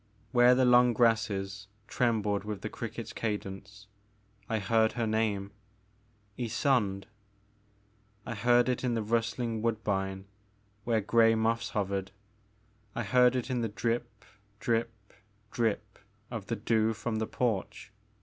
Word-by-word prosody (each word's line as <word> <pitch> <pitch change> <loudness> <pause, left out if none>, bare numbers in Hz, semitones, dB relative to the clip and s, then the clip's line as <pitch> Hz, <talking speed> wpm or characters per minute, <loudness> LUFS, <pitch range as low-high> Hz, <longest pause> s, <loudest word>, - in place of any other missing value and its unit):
Where 120 0 +6
the 130 0 +3
long 125 0 +6
grasses 100 -4 +1 0.2
trembled 105 -4 0
with 105 -2 -5
the - - -4
cricket's - - -6
cadence 100 -1 -5 0.6
I 110 - +1
heard 110 +2 +2
her 120 -2 -1
name, 110 -3 0 0.9
Ysonde; 110 -5 0 1.2
I 120 - -4
heard 120 +3 +3
it 125 0 -1
in 120 -2 0
the 115 - -1
rustling 115 +1 -1
woodbine 95 -4 -1 0.6
where 115 -2 +2
grey 115 +2 +4
moths 115 +1 0
hovered; 100 -1 -1 0.9
I 115 - -1
heard 125 +3 +4
it 125 +1 -2
in 125 -1 0
the 115 - -1
drip, 115 +1 -3 0.3
drip, 115 0 0 0.6
drip 105 -3 -2 0.3
of 110 -5 -5
the 115 - -1
dew 110 -1 +1
from 110 +1 -3
the 110 0 -1
porch. 115 -7 -2
115 Hz, 130 wpm, -30 LUFS, 105-120 Hz, 1.2 s, Where